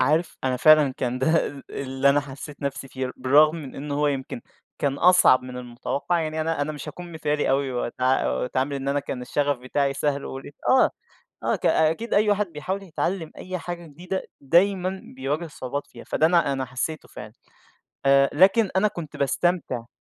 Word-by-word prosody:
عارف 155 +6 +1
أنا 130 -1 +1
فعلًا 150 -1 +6
كان 125 0 -2
ده 160 +6 +2 0.2
اللي 135 0 0
أنا 145 +1 +4
حَسّيت 140 +1 -10
نفسي 135 -1 -4
فيه، 130 -1 -4
بالرغم 150 +5 +4
من 145 -5 -8
إنه 145 +1 -4
هو 150 +1 +1
يمكن 135 -4 -2 0.4
كان 140 -1 0
أصعب 180 -8 +6
من 125 0 -8
المُتوقّع، 125 +7 -2
يعني 155 0 -2
أنا 160 -1 -1
أنا 155 - -2
مش 145 -2 -8
هاكون 175 -1 -9
مثالي 150 -2 0
أوي، 135 0 +1
وأتع 125 - 0
وأتعامل 130 - -1
إن 135 0 -4
أنا 140 +1 +1
كان 130 -2 -5
الشّغف 145 +2 0
بتاعي 140 +2 -1
سهل، 140 -1 -1
واقول 135 +1 -7
إيه، - - -10 0.2
آه، 260 0 +5 0.5
آه، - - +1
ك - - -3
أكيد 165 +9 +2
أي 210 +1 +4
واحد 205 0 +2
بيحاول 185 +6 -4
يتعلّم 175 -1 -3
أي 185 0 -5
حاجة 175 0 -6
جديدة، 180 +5 -5 0.2
دايمًا 185 +5 +2 0.2
بيواجه 145 +6 -2
صعوبات 140 -2 -5
فيها، - - -13
فده 160 - +2
أنا 170 -4 +3
أنا 135 -1 -2
حَسّيته 130 +5 -4
فعلًا، - - -10 0.7
آآ 140 0 +5
لكن 195 +6 +5
أنا 210 +3 +4
كنت 170 -6 -8
باستمتع. 140 -4 0
145 Hz, 185 wpm, -24 LUFS, 135-170 Hz, 0.7 s, فعلًا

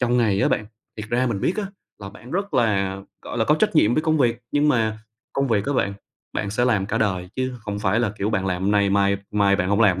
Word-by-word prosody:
trong 125 -1 +2
ngày 105 -5 +2
á - - +3
bạn, 105 - 0 0.3
thiệt 105 0 -6
ra 125 +3 +1
mình 105 -5 -2
biết 185 - 0
á, 210 -2 -2 0.3
là 100 - -8
bạn 110 +5 -13
rất 200 +3 -3
là, 100 -4 +1 0.3
gọi - - -6
là, - - +2
có - - +4
trách - - +1
nhiệm 110 +3 +4
với 155 - +1
công 155 -1 +1
việc, 120 -2 +1
nhưng 145 +1 +3
mà 110 -5 +1 0.3
công 135 -1 0
việc 105 -1 +1
á 145 - 0
bạn, 100 -6 0 0.4
bạn 100 - -2
sẽ 115 +4 +1
làm 105 -6 +1
cả - - -1
đời 95 -4 -1
chứ 130 0 -1
không 105 -1 -5
phải 105 +2 +1
là, 120 -4 +1
kiểu, 105 +3 -1
bạn 95 -2 -1
làm 90 0 -2
hôm 100 - +1
nay, 100 -1 +3
mai 100 0 +3
mai 100 -1 +3
bạn 95 0 -1
hổng 100 +2 +2
làm 95 -4 +4
105 Hz, 275 wpm, -23 LUFS, 100-125 Hz, 0.4 s, có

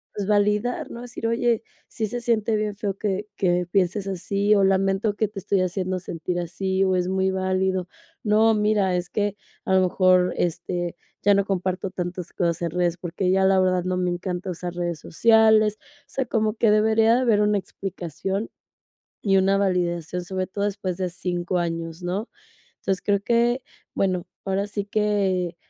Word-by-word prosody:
pues, 200 -2 -3
validar, 210 +3 +1
no?, 235 - -7
decir: 245 -2 -5
"Oye, 230 -1 +1 0.2
sí 220 - -3
se 245 +4 -4
siente 225 -2 +1
bien 210 -1 -2
feo 200 -1 -3
que 205 0 -2
que 180 -1 +1
pienses 195 +1 +1
así 200 +2 +1
o 200 - +4
lamento 195 +2 +1
que 215 - +1
te 210 -1 -7
estoy 195 0 +1
haciendo 185 0 -1
sentir 175 0 -4
así 190 +2 -1
o 190 -1 +2
es 180 -1 0
muy 190 0 +1
válido 185 -1 0 0.4
no, 220 +1 +4
mira, 210 -3 +2
es 175 0 -2
que 205 -1 -1 0.3
a 190 - +2
lo 190 - +5
mejor, 185 0 +3
este, 175 0 -2 0.3
ya 205 - +5
no 200 0 +2
comparto 185 -1 -2
tantas 180 -1 -5
cosas 170 -1 0
en 170 - -1
redes, 175 0 0
porque 180 +2 -2
ya 190 0 +3
la 190 0 +4
verdad 185 -1 +2
no 185 0 0
me 180 -1 0
encanta 180 +1 -3
usar 175 0 -5
redes 175 -2 -2
sociales", 220 +1 +4
o 290 0 -26
sea, 265 - -2
como 220 -2 0
que 225 -1 +3
debería 220 +1 +4
de 250 - +2
haber 225 -5 +3
una 210 0 +3
explicación 190 +2 -4 0.7
y 195 -2 +3
una 195 +1 +3
validación, 180 -3 0
sobre 185 0 -3
todo 200 +1 -2
después 190 -3 -3
de 185 -1 -1
5 175 0 -2
años, 165 0 -4
¿no?, 190 +6 -3 0.5
entonces, 190 -2 -1
creo 200 -1 +2
que 240 +3 +2 0.3
bueno, 185 -3 0 0.2
ahora 195 +1 0
sí 205 -1 -3
que, 200 -4 0
190 Hz, 180 wpm, -24 LUFS, 180-210 Hz, 0.7 s, lo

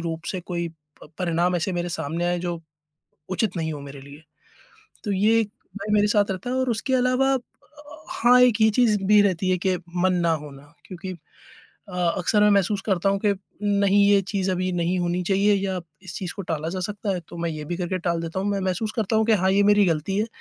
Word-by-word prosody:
रूप 165 0 -4
से 185 - -4
कोई 170 -1 -4 0.3
प - - -12
परिणाम 175 0 +1
ऐसे 175 +3 -2
मेरे 175 0 -2
सामने 165 +1 -3
आए 175 0 0
जो 175 -1 -3 0.7
उचित 190 0 -1
नहीं 160 -1 -2
हो 145 - -6
मेरे 140 0 -9
लिए। 140 +3 -13 0.8
तो 205 - -2
ये 215 +4 +3
एक 215 - -4 0.3
भय 205 +1 -4
मेरे 210 0 +4
साथ 205 -1 +2
रहता 190 +6 -5
है 255 - -1
और 260 -1 0
उसके 235 +4 -1
अलावा 255 +2 +2
अ, 265 - +1 0.7
हाँ, 245 +1 +5
एक 240 -3 +4
ये 220 - +6
चीज़ 225 -2 +3
भी 210 +1 +6
रहती 185 -2 +1
है 180 - +2
कि 185 +1 0 0.2
मन 185 +1 +2
ना 170 - +3
होना 145 0 -12
क्योंकि 185 +1 -7 0.8
अ, 180 - -9 0.2
अक्सर 205 +4 +2
मैं 210 - +5
महसूस 200 0 +2
करता 195 -2 +1
हूँ 195 - +1
कि 205 -1 +3 0.3
नहीं, 200 0 +3
यह 200 -1 +5
चीज़ 195 -2 -1
अभी 185 0 -1
नहीं 175 +1 0
होनी 175 0 -1
चाहिए 200 +3 +3
या 190 -2 -1 0.2
इस 185 - -9
चीज़ 180 -2 -4
को 200 - -4
टाला 160 -2 -3
जा 185 - -4
सकता 205 +2 -3
है, 180 - -3
तो 170 - -13
मैं 170 0 -1
यह 155 -1 -6
भी 175 +2 -3
करके 185 +1 -2
टाल 170 -1 -1
देता 170 +3 -3
हूँ। 200 - -1
मैं 200 -1 -1
महसूस 190 +3 -2
करता 220 0 0
हूँ 220 0 +2
कि 225 - +4
हाँ, 190 -2 +3
ये 200 - +4
मेरी 205 0 +5
गलती 170 +4 0
है, 215 - +1
190 Hz, 230 wpm, -24 LUFS, 175-205 Hz, 0.8 s, ये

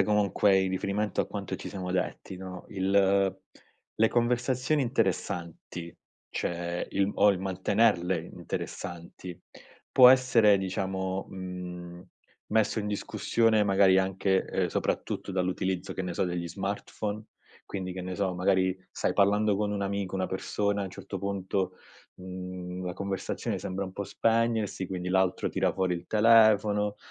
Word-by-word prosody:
sempre 95 - +4
comunque 100 -1 +3
in 95 -1 +1
riferimento 100 +3 -1
a - - -1
quanto - - -5
ci - - -7
siamo 95 -2 -5
detti, 95 0 -3
no, 90 -1 -8
il 95 0 +2 0.6
le 110 0 +4
conversazioni 125 +4 +1
interessanti, 90 - -2 0.4
cioè 85 0 -3
il 100 +1 +2
o 105 - +5
il 95 - -1
mantenerle 95 -2 +1
interessanti, 85 +1 -6 0.5
può 125 -1 +9
essere 125 -5 +6
diciamo, 95 0 -2
mhmm, 90 -1 -7 0.5
messo 110 0 +2
in 105 - -2
discussione 110 +1 +1
magari 95 -1 +5
anche, 95 0 +1
uhm, - - +1
soprattutto 95 - -2
dall'utilizzo 95 0 -1
che 95 - -3
ne 90 -1 -4
so, - - +1
degli 90 -1 -2
smartphone? 105 +2 -4 0.4
Quindi, 95 -2 -4
che 95 0 -6
ne 90 0 -4
so, 95 -2 -1
magari 95 0 +2
stai - - -1
parlando 105 0 +3
con 105 0 -1
un 100 -1 -2
amico, 100 -1 -2
una 95 -1 0
persona 100 +1 -1
a - - -3
un - - -8
certo 95 0 -7
punto, 95 -1 -2 0.4
mhmm, 90 0 -7
la 90 - -3
conversazione 100 0 -3
sembra 95 +1 -3
un 95 - -7
po' 100 - -4
spegnersi, 115 -4 0
quindi 90 -1 -4
l'altro 95 -1 +2
tira - - +1
fuori 95 -2 0
il 85 - -7
telefono, 105 -2 +4
95 Hz, 145 wpm, -28 LUFS, 90-105 Hz, 0.6 s, può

